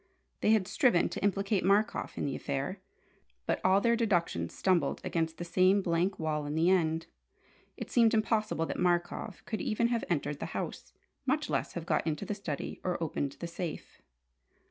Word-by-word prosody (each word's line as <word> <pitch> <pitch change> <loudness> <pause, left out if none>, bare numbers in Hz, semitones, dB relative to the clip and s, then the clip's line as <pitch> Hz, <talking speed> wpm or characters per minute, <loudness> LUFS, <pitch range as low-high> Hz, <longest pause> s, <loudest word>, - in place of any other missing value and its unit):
They - - +1
had 215 -4 +4
striven 250 - +3
to - - -5
implicate 200 0 +1
Markoff 200 +3 +1
in - - -1
the 140 - -2
affair, 140 +7 -3 0.6
but - - 0
all 190 +1 +5
their 235 +3 +3
deductions 175 - 0
stumbled 175 -7 +1
against 160 -1 -1
the 175 - -5
same 185 +3 +3
blank 175 +2 +1
wall 155 -2 -2
in 145 - -3
the 165 +3 +4
end. 165 -3 +2 0.7
It - - -7
seemed 230 -2 +5
impossible 215 -6 +1
that - - -4
Markoff 175 +2 -1
could 220 - -3
even 235 +2 +1
have 235 -2 0
entered 150 -3 -1
the - - -3
house, - - -5 0.4
much 300 +3 0
less - - -1
have 170 -2 -5
got - - 0
into 150 -2 -2
the - - -2
study 175 -8 -5
or 180 -1 0
opened 145 -4 -2
the 170 - -6
safe. 170 -1 -6
180 Hz, 180 wpm, -31 LUFS, 160-210 Hz, 0.7 s, all